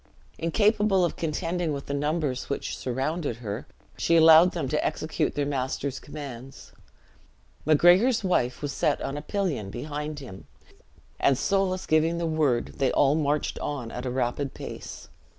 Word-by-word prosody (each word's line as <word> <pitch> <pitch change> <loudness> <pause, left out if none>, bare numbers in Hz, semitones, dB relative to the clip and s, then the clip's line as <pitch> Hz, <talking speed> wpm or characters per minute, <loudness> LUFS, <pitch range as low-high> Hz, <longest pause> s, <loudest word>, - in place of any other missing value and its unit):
Incapable 205 +2 +2
of 170 - -3
contending 165 0 -2
with 140 -1 -5
the 140 - -4
numbers 145 -2 -1
which 140 - -3
surrounded 135 +2 -2
her, 110 -1 -6 0.3
she 170 - +2
allowed 165 +2 +7
them 165 -6 -2
to 150 +3 0
execute 155 0 -1
their 145 - 0
master's 135 0 -2
commands. 135 -3 -9 1.0
Macgregor's 180 - +5
wife 150 -9 0
was 145 - -2
set - - +1
on 135 - -3
a 145 - -4
pillion 155 - -2
behind 150 +6 -5
him; 110 -9 -10 0.7
and 135 - +3
Soulis 190 +3 0
giving 160 +2 +2
the 170 - -1
word, 150 -7 0
they 135 -2 +2
all 140 0 +4
marched 150 -1 0
on 135 -6 -4
at 125 +1 -5
a - - 0
rapid 130 +2 -2
pace. - - -8
150 Hz, 150 wpm, -26 LUFS, 135-170 Hz, 1.0 s, allowed